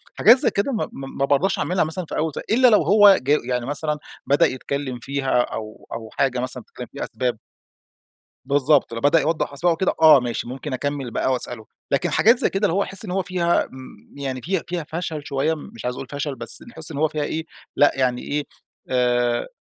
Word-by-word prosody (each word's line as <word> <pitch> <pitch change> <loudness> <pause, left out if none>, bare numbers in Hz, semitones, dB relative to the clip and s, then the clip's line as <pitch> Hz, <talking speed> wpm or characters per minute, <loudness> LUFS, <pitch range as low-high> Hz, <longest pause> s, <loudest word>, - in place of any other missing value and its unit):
حاجات 235 +4 +7
زي - - +5
كده 200 +8 -1
م 235 - -1
م 135 0 -9
ما 140 - +2
بارضاش 175 +8 +1
أعملها 180 +1 +1
مثلًا 160 +3 -3
في - - -6
أول 160 0 0
س - - -10
إلّا 250 +3 +5
لو 215 -7 +5
هو 200 +4 +7
جو 145 +4 +2
يعني 125 -1 -2
مثلًا 150 +2 -2 0.3
بدأ 140 +2 +4
يتكلم 130 -1 -3
فيها، 135 -1 0
أو 110 -2 -7
أو 110 -1 -7
حاجة 130 -2 0
مثلًا 125 -1 -4
بتتكلم 125 +2 -10
في 140 - -5
أسباب 125 -3 -2 1.1
بالضبط، 140 -1 +2
لو 115 - -5
بدأ 145 +3 +4
يوضّح 155 -2 -1
أسباب 165 +5 +1
أو - - +1
كده 190 - +1
آه، 155 -3 +8
ماشي 120 -2 -4
ممكن 135 +2 -6
أكمّل 140 -1 -3
بقى 130 - 0
وأسأله. 120 -3 -3 0.3
لكن 140 - +1
حاجات 230 +4 +4
زي - - +2
كده 195 +2 0
اللي 165 - -1
هو 200 +2 +2
احس 195 +3 -3
إن 185 - -6
هو 190 +1 0
فيها 180 -2 +1
آمم 130 0 -14
يعني 135 -2 -4
فيها 185 +5 -2
فيها 175 -1 -3
فشل 160 -2 -4
شوية، 140 +3 0
مش 125 -7 -10
عايز 125 0 -2
أقول 135 - -7
فشل، 145 0 -3
بس 120 - +4
نحِسّ 160 -8 -5
إن 145 - -6
هو 155 +2 +2
فيها 150 -1 -3
إيه، 160 +2 -3 0.3
لأ، 145 - +5
يعني 125 -2 0
إيه، 145 0 -2 0.5
آآ 120 -1 +1
145 Hz, 215 wpm, -22 LUFS, 130-165 Hz, 1.1 s, آه